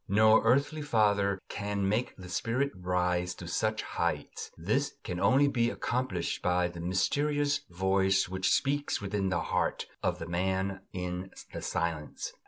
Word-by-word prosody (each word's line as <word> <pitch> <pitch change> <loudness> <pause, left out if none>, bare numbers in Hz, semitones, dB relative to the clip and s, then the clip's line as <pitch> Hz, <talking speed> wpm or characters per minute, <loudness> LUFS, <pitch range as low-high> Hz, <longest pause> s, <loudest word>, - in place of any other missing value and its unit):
No 110 +2 +6
earthly 140 +6 +2
father 105 -7 +2
can 100 -1 -2
make 110 +5 0
the 90 -2 -9
spirit 120 +9 0
rise 90 0 0
to 85 - -9
such 110 +6 0
heights; - - -3
this - - 0
can 90 - -4
only 135 +8 +5
be 120 -4 +2
accomplished 120 -9 -2
by 90 0 +2
the 85 -1 -9
mysterious 145 - +1
voice 95 +1 +2
which 95 +1 0
speaks 145 +1 +1
within 100 -1 -1
the 90 - 0
heart - - 0 0.2
of - - 0
the 80 - -6
man 95 +2 -1
in 90 +1 -4 0.2
the - - -5
silence. 80 -2 -3
95 Hz, 150 wpm, -30 LUFS, 90-115 Hz, 0.2 s, No